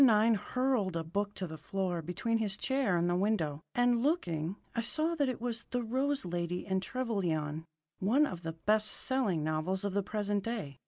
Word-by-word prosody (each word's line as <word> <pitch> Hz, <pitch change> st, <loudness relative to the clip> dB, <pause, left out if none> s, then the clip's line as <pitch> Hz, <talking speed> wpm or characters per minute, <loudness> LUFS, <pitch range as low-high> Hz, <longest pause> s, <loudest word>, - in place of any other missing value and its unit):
9 225 Hz, -2 st, +6 dB
hurled 225 Hz, -4 st, 0 dB
a 165 Hz, -, -1 dB
book 200 Hz, +5 st, -2 dB
to 190 Hz, -, -3 dB
the 160 Hz, -2 st, -7 dB
floor 180 Hz, +1 st, -2 dB
between 225 Hz, +8 st, -1 dB
his 210 Hz, -2 st, 0 dB
chair 265 Hz, -9 st, +1 dB
and 170 Hz, +1 st, +2 dB
the 175 Hz, -, +2 dB
window, 175 Hz, -7 st, +1 dB
and, 245 Hz, -1 st, +4 dB
looking, 180 Hz, -, 0 dB, 0.2 s
I 230 Hz, -, 0 dB
saw 310 Hz, +8 st, +1 dB
that 290 Hz, -5 st, +1 dB
it 255 Hz, -, -3 dB
was 235 Hz, -1 st, -2 dB
"The 245 Hz, -1 st, -1 dB
Rose 265 Hz, +2 st, 0 dB
Lady 175 Hz, 0 st, -2 dB
and 190 Hz, -1 st, 0 dB
Trevelyan," 170 Hz, -, -1 dB, 0.3 s
one 245 Hz, +11 st, +4 dB
of 180 Hz, -, -5 dB
the 165 Hz, -1 st, -4 dB
best 215 Hz, +6 st, +2 dB
selling 220 Hz, -, 0 dB
novels 155 Hz, +5 st, -1 dB
of 200 Hz, -, -1 dB
the 200 Hz, -, +2 dB
present 205 Hz, 0 st, -1 dB
day. 200 Hz, -, -4 dB
200 Hz, 195 wpm, -32 LUFS, 175-240 Hz, 0.3 s, 9